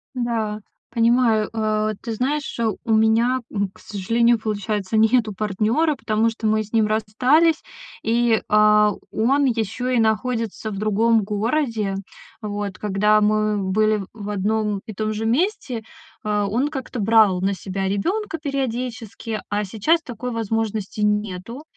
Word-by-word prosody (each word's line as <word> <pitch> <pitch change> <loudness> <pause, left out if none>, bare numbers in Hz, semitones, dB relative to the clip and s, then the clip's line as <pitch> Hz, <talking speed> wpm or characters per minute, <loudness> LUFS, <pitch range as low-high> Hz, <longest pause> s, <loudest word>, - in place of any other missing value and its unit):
Да, 225 -3 -2 0.3
понимаю. 230 -2 +3
Э, 215 -1 0
ты 230 - -4
знаешь, 275 +5 -2 0.3
у 225 - 0
меня, 225 +4 +3
м, 200 -2 -1
к - - -20
сожалению, 230 +4 +1
получается, 210 -1 -2
нету 220 -1 +3
партнёра, 215 - +1
потому 220 -1 +1
что 225 -1 -3
мы 215 0 +2
с 215 - -16
ним 220 -1 +4
расстались, 255 +10 +2 0.4
и, 230 0 +2
а, 210 0 +5 0.2
он 275 +6 +2
ещё 235 0 -1
и 250 -2 +2
находится 225 0 -1
в 195 - -5
другом 215 +1 +2
городе. 215 -1 -1 0.5
Вот, 205 -2 -4
когда 210 +1 +2
мы 215 0 +2
были 215 0 +2
в 210 -2 -7
одном 210 0 -1
и 220 - -7
том 215 +2 -2
же 220 +1 -3
месте, 255 - 0 0.4
э, 210 -1 +1
он 250 +7 +1
как-то 265 -4 -5
брал 210 -3 +4
на 195 +1 +1
себя 190 +1 -3
ребёнка 340 - -1
периодически, 240 -6 -4
а 205 0 0
сейчас 230 - +1
такой 250 -1 -6
возможности 220 -2 -2
нету. 210 +5 -1
220 Hz, 140 wpm, -22 LUFS, 210-235 Hz, 0.5 s, а